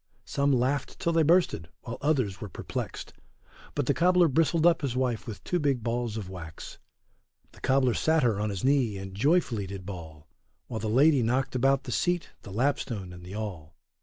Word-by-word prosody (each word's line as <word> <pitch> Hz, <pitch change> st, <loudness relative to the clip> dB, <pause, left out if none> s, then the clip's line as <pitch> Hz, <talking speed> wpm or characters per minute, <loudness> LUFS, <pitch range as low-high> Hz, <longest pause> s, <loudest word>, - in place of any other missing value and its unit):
Some 140 Hz, 0 st, +1 dB
laughed 130 Hz, +2 st, 0 dB
till 170 Hz, -, 0 dB
they 165 Hz, -, +4 dB
bursted, 160 Hz, -, +2 dB
while 120 Hz, -1 st, -7 dB
others 130 Hz, -11 st, 0 dB
were 105 Hz, -, -5 dB
perplexed, -, -, -6 dB, 0.6 s
But 145 Hz, -, 0 dB
the 140 Hz, -, +2 dB
cobler 180 Hz, +1 st, +4 dB
bristled 160 Hz, +3 st, +2 dB
up 170 Hz, -1 st, +5 dB
his 135 Hz, -4 st, -2 dB
wife 125 Hz, -3 st, -1 dB
with 110 Hz, -3 st, -7 dB
two 180 Hz, -, 0 dB
big 140 Hz, -6 st, 0 dB
balls 120 Hz, -1 st, -2 dB
of 105 Hz, -4 st, -5 dB
wax; 80 Hz, -4 st, -9 dB, 0.7 s
The -, -, -18 dB
cobler 130 Hz, -1 st, +3 dB
sat 160 Hz, +3 st, +2 dB
her 110 Hz, -5 st, +2 dB
on 105 Hz, +1 st, 0 dB
his 100 Hz, -3 st, -4 dB
knee, 130 Hz, -6 st, +2 dB
and 95 Hz, 0 st, -7 dB
joyfully 120 Hz, -, +1 dB
did 95 Hz, -1 st, -7 dB
bawl, 80 Hz, -5 st, -9 dB, 0.4 s
While 110 Hz, -, -5 dB
the 110 Hz, 0 st, -2 dB
lady 140 Hz, +4 st, +5 dB
knocked 125 Hz, +4 st, 0 dB
about 135 Hz, +2 st, +2 dB
the 125 Hz, -, -6 dB
seat 175 Hz, +6 st, 0 dB
the 100 Hz, -, -10 dB
lapstone 115 Hz, -5 st, -1 dB
and 90 Hz, 0 st, -11 dB
the 90 Hz, +3 st, -8 dB
awl. 90 Hz, -8 st, -6 dB
125 Hz, 190 wpm, -28 LUFS, 100-145 Hz, 0.7 s, up